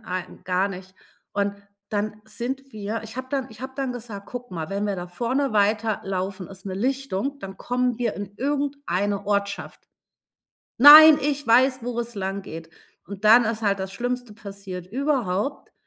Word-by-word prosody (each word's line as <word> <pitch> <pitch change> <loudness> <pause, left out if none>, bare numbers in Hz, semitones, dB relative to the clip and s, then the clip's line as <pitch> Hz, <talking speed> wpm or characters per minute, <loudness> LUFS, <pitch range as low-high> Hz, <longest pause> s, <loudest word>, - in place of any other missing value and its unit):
nein - - -22
ein 180 0 -6
gar 185 +2 +1
nicht. 185 0 -9 0.4
Und 200 0 0 0.4
dann 215 0 -2
sind 260 +5 -5
wir 215 +1 -4
ich 225 +2 -10
habe 260 0 -5
dann 270 -2 -2
ich 220 +1 -14
habe 260 0 -7
dann 265 -2 -2
gesagt: 220 -5 -8
„Guck 245 0 -8
mal, 165 0 -5
wenn 200 +1 -1
wir 200 -2 -1
da 175 0 -5
vorne 240 +8 -1
weiterlaufen, 200 -3 0
ist 195 -1 -12
'ne 190 - -4
Lichtung, 270 +2 -2
dann 195 -4 -9
kommen 245 -1 -1
wir 235 -3 -1
in 200 0 -7
irgendeine 270 -9 -1
Ortschaft.“ 200 -1 -2 0.9
„Nein, 300 +4 +11
ich 290 -1 -1
weiß, 255 +3 +5
wo 240 0 -4
es 235 0 -6
langgeht“. 190 -5 -5 0.4
Und 200 +1 -9
dann 230 +3 +7
ist 225 0 -2
halt 200 -1 +1
das 190 0 -5
Schlimmste 245 0 -3
passiert 195 -4 -8
überhaupt, 255 -1 -2
215 Hz, 170 wpm, -24 LUFS, 195-255 Hz, 0.9 s, Nein